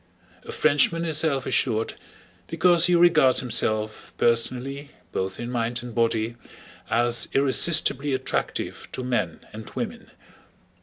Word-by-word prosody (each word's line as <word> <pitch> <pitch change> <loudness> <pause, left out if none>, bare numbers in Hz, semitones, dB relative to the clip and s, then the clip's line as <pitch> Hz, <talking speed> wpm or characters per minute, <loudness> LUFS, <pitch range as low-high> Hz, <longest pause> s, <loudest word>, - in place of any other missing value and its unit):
A - - -6
Frenchman 155 +3 +2
is 155 -2 +1
self 140 -5 0
assured 115 -3 0 0.5
because 170 +1 +3
he 180 - +3
regards 165 -7 +4
himself 110 -3 -2
personally, 130 +4 0 0.2
both 95 0 -4
in 120 +1 -5
mind 120 0 -2
and 120 -1 -8
body, 115 0 -1 0.5
as 120 0 +1
irresistibly 140 0 +3
attractive 130 0 -3
to 130 - -5
men 120 -10 -2
and 110 +1 -9
women. - - -6
125 Hz, 120 wpm, -24 LUFS, 115-150 Hz, 0.5 s, regards